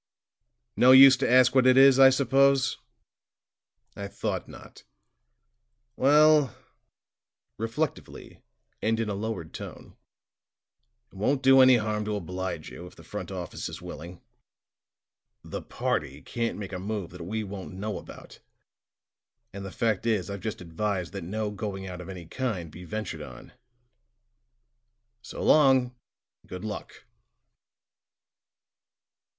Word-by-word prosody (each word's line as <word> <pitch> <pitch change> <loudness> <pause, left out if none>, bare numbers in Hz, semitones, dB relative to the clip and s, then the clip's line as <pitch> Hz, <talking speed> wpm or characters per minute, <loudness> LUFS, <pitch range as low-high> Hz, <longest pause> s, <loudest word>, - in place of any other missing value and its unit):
"No 130 +1 +6
use 135 0 +9
to 135 - -1
ask 125 0 +5
what 130 -1 +4
it 130 0 +5
is, 135 0 +7
I 135 0 +9
suppose? 135 0 +2 1.2
I 100 - -6
thought - - -4
not. - - -14 1.1
Well," 150 -1 +4 1.0
reflectively, 120 +7 -5 0.4
and 110 +1 0
in 115 -2 -1
a - - -2
lowered 100 -5 -5
tone, - - -10 1.2
"it - - -16
won't 135 +7 0
do 135 0 +7
any 130 0 +7
harm 105 -1 -2
to 105 0 -2
oblige 90 -3 -5
you, 90 - -10
if - - -16
the - - -15
front - - -7
office - - -6
is - - -8
willing. 85 +3 -10 1.2
The - - -6
party 70 +2 -3
can't 115 - -3
make 100 -2 -7
a 90 - -4
move 100 -2 -4
that 90 0 -10
we 110 +6 -4
won't 100 -2 -8
know 105 +2 -4
about; - - -13 1.1
and 100 0 -7
the 95 - -6
fact 110 +2 -1
is, 105 -4 0
I've 100 -1 -6
just 110 -4 -5
advised 90 +1 -3
that 100 - -6
no 105 +4 -3
going 100 -2 -5
out 90 -1 -7
of 90 - -10
any 90 -3 -8
kind 95 -6 -4
be 90 +3 -11
ventured 110 +1 -5
on. - - -11 1.7
So - - -8
long, 130 -4 +4 0.5
and - - -27
good 90 +3 -7
luck." 105 - -8
105 Hz, 135 wpm, -27 LUFS, 95-130 Hz, 1.7 s, use